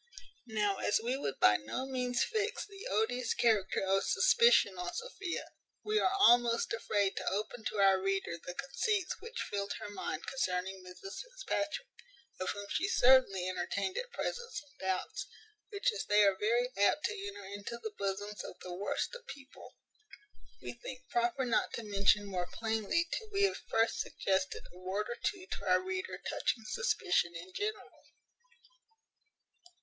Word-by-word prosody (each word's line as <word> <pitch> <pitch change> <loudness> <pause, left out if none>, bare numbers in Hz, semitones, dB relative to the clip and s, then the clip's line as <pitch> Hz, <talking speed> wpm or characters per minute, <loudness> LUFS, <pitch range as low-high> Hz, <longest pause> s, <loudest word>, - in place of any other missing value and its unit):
Now, 210 -3 +1
as 205 - +2
we 240 +3 -1
would 140 - -3
by 105 0 +6
no 110 - -4
means 250 -2 0
fix 435 -1 -1
the 400 +3 -9
odious 250 - +1
character 215 -6 +2
of 195 +1 +2
suspicion 475 0 +5
on 360 0 -3
Sophia, 400 -6 -4 0.4
we 425 0 +2
are 375 - +3
almost 240 -11 +5
afraid 205 -3 +1
to - - 0
open 215 +4 -3
to - - -2
our 195 -1 +5
reader 195 -2 0
the 180 - -6
conceits 375 - -1
which 460 +3 -5
filled 200 0 -1
her 205 - -7
mind - - -4
concerning 190 -6 -2
Mrs 180 +2 -8
Fitzpatrick; - - -3 0.5
of 185 - -1
whom 205 0 -4
she 370 - +1
certainly 250 - +5
entertained 185 +1 -2
at - - -4
present 475 0 -3
some 290 -1 -6
doubts; 190 -1 -2 0.4
which, 415 +4 +1
as 445 - -3
they 210 0 +5
are 200 -1 +5
very 235 +5 +1
apt 205 +9 +3
to 405 -1 -3
enter 300 - -8
into 205 +4 -6
the 220 -2 -5
bosoms 205 +1 -3
of - - -8
the 180 - -6
worst 200 - -2
of - - -10
people, 275 - -11 0.9
we - - -5
think 255 +1 -9
proper 240 +3 +1
not 235 - +1
to 230 - -4
mention 205 0 +3
more 180 -3 -2
plainly 225 +9 0
till 445 -2 -3
we 400 0 +2
have 395 - +3
first 225 0 +2
suggested 190 -1 -1
a 180 - -13
word 190 +3 -2
or 240 - -4
two 380 -3 -1
to - - -4
our - - +5
reader 375 0 -4
touching 225 - -1
suspicion 370 - +1
in 180 +2 -8
general. 425 +1 -4
230 Hz, 165 wpm, -33 LUFS, -, 0.9 s, by